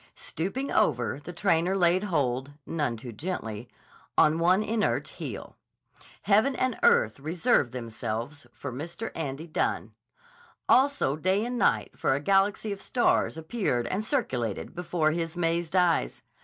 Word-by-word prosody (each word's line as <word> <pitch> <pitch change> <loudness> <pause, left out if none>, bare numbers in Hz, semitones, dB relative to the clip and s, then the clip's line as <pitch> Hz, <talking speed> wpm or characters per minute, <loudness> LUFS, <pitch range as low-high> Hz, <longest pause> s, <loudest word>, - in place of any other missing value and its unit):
Stooping 195 - -3
over, 125 - +1
the 155 +4 -8
trainer 175 +1 +1
laid 180 +2 +3
hold, 140 -6 -1
none 145 -8 -1
too 120 +2 -8
gently, 115 - -5 0.5
on 155 +2 +5
one 180 +5 +4
inert 220 0 0
heel. - - -7 0.7
Heaven 220 +7 +3
and 255 -2 0
earth 110 +4 +4
reversed 160 - +1
themselves 120 +3 -5
for 140 +2 -7
Mr. 170 - -5
Andy 150 0 -4
Dunne. 160 - -2 0.7
Also 265 - +3
day 190 +7 +1
and 245 0 -3
night, - - +1
for 135 - +2
a - - -1
galaxy 195 +6 +2
of 200 -1 -5
stars 240 -8 +1
appeared 160 - -1
and 190 - -2
circulated 125 - -2
before 170 -3 0
his 165 +1 -3
mazed 170 0 0
eyes. 175 - +2
165 Hz, 140 wpm, -27 LUFS, 135-195 Hz, 0.7 s, on